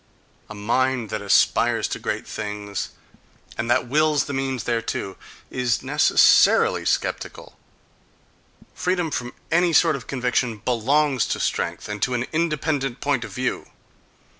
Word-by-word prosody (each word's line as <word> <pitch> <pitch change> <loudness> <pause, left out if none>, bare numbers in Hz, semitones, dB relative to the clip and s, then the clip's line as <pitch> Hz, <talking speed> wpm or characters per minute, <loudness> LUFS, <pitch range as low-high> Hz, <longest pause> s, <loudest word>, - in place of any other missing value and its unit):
A 105 - -8
mind 120 +2 0
that 110 -1 -3
aspires 100 -1 +2
to - - -4
great - - -3
things, 105 -2 -5 0.7
and 115 - -3
that 120 0 +2
wills 150 +2 +2
the 140 - -5
means 135 -2 -2
thereto, 115 -4 -2 0.4
is 125 -2 -1
necessarily - - +4
sceptical. - - -2 1.2
Freedom 180 -3 -1
from 125 -2 -3 0.2
any 170 +1 +3
sort 160 -1 +4
of 130 - -8
conviction 125 -3 -1
belongs 130 +4 +1
to - - -2
strength, - - -2
and 105 -1 -5
to 125 - +1
an 120 +1 -1
independent 155 -5 -1
point 140 -4 0
of 115 - -7
view.... 130 +6 -3
125 Hz, 135 wpm, -23 LUFS, 115-145 Hz, 1.2 s, necessarily